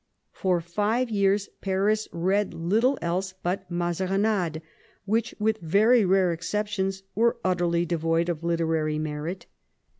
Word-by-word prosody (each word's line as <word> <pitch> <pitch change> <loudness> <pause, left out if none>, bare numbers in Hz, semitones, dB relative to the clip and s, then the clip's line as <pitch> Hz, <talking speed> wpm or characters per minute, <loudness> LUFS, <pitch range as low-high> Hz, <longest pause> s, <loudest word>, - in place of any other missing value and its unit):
For 180 -2 0
five 210 +8 -1
years 200 -1 +2
Paris 205 +3 +1
read 190 +2 0
little 220 +11 +2
else 185 +2 -2
but 180 +1 -2
Mazarinades, 180 0 0 0.4
which, 225 +3 0
with 220 +1 0
very 215 +8 +4
rare 185 -1 +3
exceptions, 195 +2 -2
were 230 +4 +2
utterly 175 -2 +1
devoid 165 0 0
of 170 -2 -3
literary 165 -2 0
merit. 155 +4 -4
185 Hz, 120 wpm, -26 LUFS, 170-210 Hz, 0.4 s, very